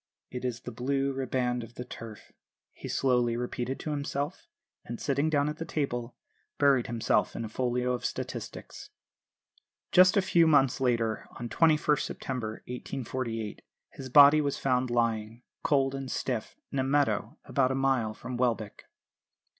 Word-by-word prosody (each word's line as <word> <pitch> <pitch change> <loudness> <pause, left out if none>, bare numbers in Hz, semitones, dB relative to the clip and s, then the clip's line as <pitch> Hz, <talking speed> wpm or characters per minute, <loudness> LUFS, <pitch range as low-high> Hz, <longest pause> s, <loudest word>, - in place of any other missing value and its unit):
"'It 125 0 -5
is 125 -2 -3
the 125 - -7
Blue 135 +3 -1
Riband 125 -2 -1
of 115 +1 -12
the 125 - -6
Turf,' 115 -3 -10 0.4
he - - -9
slowly 125 -3 +1
repeated 125 +1 -3
to 155 - -3
himself; 145 - -3 0.4
and, 120 - -7
sitting 140 +2 +1
down 145 -2 +2
at 150 +2 -4
a - - +1
table, 125 -7 -3 0.4
buried 140 -4 +4
himself 115 -2 +1
in 115 - -3
a - - -4
folio 125 +1 0
of 125 - -4
statistics." - - -6 1.0
Just 185 +3 +6
a - - +6
few 170 -3 +4
months 135 -4 +4
later, 115 -3 0
on 120 0 -5
21st 155 -1 +3
September 115 -5 -4
1848, 120 -3 -4 0.3
his 130 -1 -8
body 145 +3 +8
was 140 -1 -1
found 130 -1 +1
lying, 115 -1 -1 0.2
cold 135 -2 +2
and 135 -1 -5
stiff, 125 -4 -3 0.2
in 140 - -1
a - - +2
meadow 130 -6 +1
about 130 -2 +2
a 130 - 0
mile 130 -5 +1
from 125 +2 -6
Welbeck. 115 -4 -1
130 Hz, 155 wpm, -29 LUFS, 120-140 Hz, 1.0 s, body